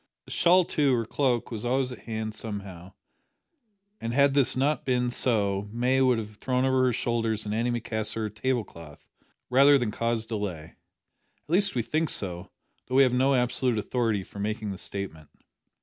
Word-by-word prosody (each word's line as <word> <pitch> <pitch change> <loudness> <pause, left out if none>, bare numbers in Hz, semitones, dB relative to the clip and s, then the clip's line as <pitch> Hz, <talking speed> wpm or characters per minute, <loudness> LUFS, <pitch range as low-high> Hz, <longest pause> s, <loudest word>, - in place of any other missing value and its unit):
A - - -12
shawl 180 +1 +4
too, 140 -5 +2
or 115 -1 -1
cloak, 125 -1 0
was 110 -2 -5
always 130 +1 0
at 125 - -8
hand, 110 +1 -5
somehow, 100 -4 -8 1.1
and 115 +1 -4
had 140 0 +4
this 140 -2 +3
not 140 +1 +1
been 125 -1 0
so 100 -5 0
May 125 +3 +1
would 130 -2 +4
have 105 -1 -6
thrown 130 +2 0
over 130 -1 +3
her 125 - +3
shoulders 115 -2 -1
an 105 - -4
antimacassar 115 -1 -2
or - - -3
table 120 +3 -1
cloth 80 -6 -14 0.5
rather 140 +3 +6
than 120 -5 -1
cause 115 0 -1
delay, 100 -8 -4 0.8
at - - -40
least 190 +1 +2
we 120 - 0
think 155 +6 -1
so, 90 -3 -3 0.4
though 130 - -3
we 135 - +7
have 125 -2 +2
no 135 +2 +3
absolute 125 -1 +1
authority 110 -2 -1
for 100 - -12
making 105 0 -3
the 95 - -7
statement. 90 -7 -6
120 Hz, 180 wpm, -27 LUFS, 105-130 Hz, 1.1 s, we